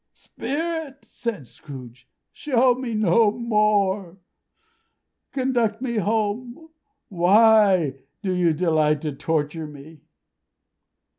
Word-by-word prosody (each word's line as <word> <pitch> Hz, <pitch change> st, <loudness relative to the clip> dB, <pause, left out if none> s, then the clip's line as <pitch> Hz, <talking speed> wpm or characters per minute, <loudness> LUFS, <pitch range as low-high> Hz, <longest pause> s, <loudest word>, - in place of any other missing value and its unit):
"Spirit!" 320 Hz, -2 st, -5 dB
said 205 Hz, -, -5 dB
Scrooge, 125 Hz, -4 st, -12 dB, 0.2 s
"show 255 Hz, -3 st, +2 dB
me 245 Hz, -2 st, -5 dB
no 215 Hz, +1 st, +3 dB
more! 210 Hz, -5 st, 0 dB, 1.1 s
Conduct 245 Hz, -5 st, 0 dB
me 240 Hz, -3 st, -3 dB
home. 225 Hz, +8 st, -2 dB, 0.4 s
Why 190 Hz, -, +4 dB, 0.2 s
do 190 Hz, -, -1 dB
you 180 Hz, -2 st, +2 dB
delight 155 Hz, -2 st, +1 dB
to 155 Hz, -, -2 dB
torture 155 Hz, +2 st, -2 dB
me?" 150 Hz, +1 st, -13 dB
205 Hz, 90 wpm, -23 LUFS, 160-235 Hz, 1.1 s, Why